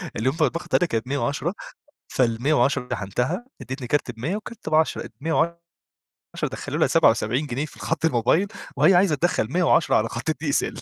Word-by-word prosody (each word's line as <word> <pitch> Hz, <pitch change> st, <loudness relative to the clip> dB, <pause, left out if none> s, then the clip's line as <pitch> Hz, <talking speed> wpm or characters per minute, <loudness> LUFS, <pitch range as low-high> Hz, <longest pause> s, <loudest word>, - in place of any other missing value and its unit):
اليوم 130 Hz, +7 st, 0 dB
ده 155 Hz, -, +5 dB
الباقة 170 Hz, +5 st, -3 dB
بتاعتها 180 Hz, -, +2 dB
كانت 115 Hz, +1 st, -2 dB
ب110 140 Hz, +5 st, -1 dB, 0.6 s
فال110 125 Hz, +1 st, +1 dB
شحنتها 125 Hz, -, -2 dB
اديتني 130 Hz, 0 st, -6 dB
كارت 140 Hz, 0 st, 0 dB
ب100 125 Hz, -, -3 dB
والكارت 215 Hz, -2 st, -7 dB
ب10 155 Hz, +1 st, +1 dB
ال110 170 Hz, +2 st, -1 dB, 0.8 s
دخلوا -, -, -4 dB
لها -, -, +4 dB
77 125 Hz, +7 st, +3 dB
جنيه 135 Hz, +3 st, -2 dB
في 150 Hz, -, -13 dB
الخط 110 Hz, +8 st, -2 dB
الموبايل 155 Hz, -, +2 dB, 0.3 s
وهي 155 Hz, +7 st, +5 dB
عايزة 180 Hz, -3 st, +4 dB
تدخل 145 Hz, -7 st, 0 dB
110 175 Hz, -2 st, +3 dB
على 110 Hz, +1 st, +2 dB
خط 120 Hz, +6 st, -4 dB
الDSL 145 Hz, -1 st, -1 dB
145 Hz, 155 wpm, -24 LUFS, 125-165 Hz, 0.8 s, ده